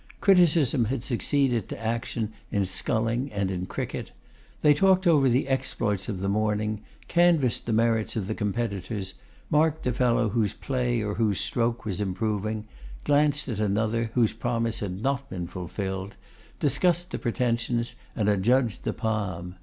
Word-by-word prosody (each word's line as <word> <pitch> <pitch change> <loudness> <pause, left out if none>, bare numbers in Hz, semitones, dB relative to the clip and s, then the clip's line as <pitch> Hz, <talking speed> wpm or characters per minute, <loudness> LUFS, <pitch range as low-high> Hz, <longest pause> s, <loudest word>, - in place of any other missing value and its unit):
Criticism 165 - +4
had 120 +1 -2
succeeded 130 -3 +1
to - - -6
action 115 -1 -2 0.2
in 100 -3 0
sculling 115 +7 -1
and 100 -2 -1
in 90 0 -3
cricket. - - -4 0.5
They 150 -1 +6
talked 190 +4 +3
over 145 -6 +5
the 125 +3 +2
exploits 120 -6 -1
of 95 -4 -3
the 100 - -1
morning; 105 +1 0 0.3
canvassed 170 -10 +3
the 115 - 0
merits 115 -1 +1
of 110 -4 -1
the 110 - -2
competitors, 100 -2 -3 0.4
marked 155 +1 +2
the 125 - 0
fellow 120 -2 +2
whose 105 -2 0
play 125 -4 -1
or 105 -1 -2
whose 105 -4 +1
stroke 115 -1 -1
was 105 -1 -2
improving; 105 +2 -2 0.4
glanced 145 0 +3
at 115 -6 -3
another, 110 +2 0
whose 120 -4 +3
promise 115 -1 -1
had 95 0 -4
not 135 0 -1
been 90 -2 -4
fulfilled; 95 +3 -5 0.4
discussed 175 +4 +1
the - - -3
pretensions, 120 -1 -1 0.2
and 105 -3 0
adjudged 110 +3 +2
the - - 0
palm. 95 -5 -3
115 Hz, 155 wpm, -26 LUFS, 105-130 Hz, 0.5 s, They